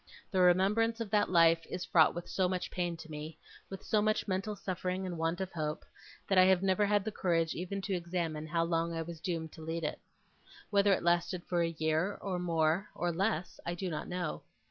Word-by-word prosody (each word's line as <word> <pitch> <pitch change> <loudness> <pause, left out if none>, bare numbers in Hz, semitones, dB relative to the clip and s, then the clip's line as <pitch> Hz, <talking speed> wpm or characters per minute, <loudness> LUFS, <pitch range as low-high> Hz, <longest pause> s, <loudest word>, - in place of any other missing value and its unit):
The 190 - +1
remembrance 200 +6 +3
of 225 -4 -4
that 205 -1 +3
life 165 -1 +5
is 180 - -4
fraught 160 -1 +4
with 175 - -5
so 185 -2 +1
much 185 -1 -3
pain 175 -2 -2
to 160 0 -11
me, 155 +1 -7 0.3
with 195 - -8
so 215 - +2
much 215 +1 +1
mental 195 +2 -1
suffering 185 -1 -3
and 180 -2 -4
want 165 +2 -1
of 190 -1 -3
hope, 155 -1 -3 0.4
that 195 -1 +4
I 185 - +8
have 190 0 +4
never 195 +2 +3
had 205 -1 +2
the 220 - -2
courage 165 -5 +1
even 190 +3 -4
to 200 - -2
examine 170 -3 -2
how 165 +1 +1
long 165 0 0
I 165 - -2
was 165 0 -8
doomed 165 -3 -3
to - - -12
lead 165 +1 -4
it. 150 - -2 0.7
Whether 200 0 +4
it 195 - +2
lasted 175 +1 +1
for 175 -1 0
a 170 - +2
year, 160 +5 0
or 185 -3 -3
more, 170 +2 +1
or 175 0 0
less, 180 -1 -1
I 170 - -3
do 180 0 -3
not 155 - -4
know. 175 -3 -3
175 Hz, 220 wpm, -32 LUFS, 165-190 Hz, 0.7 s, I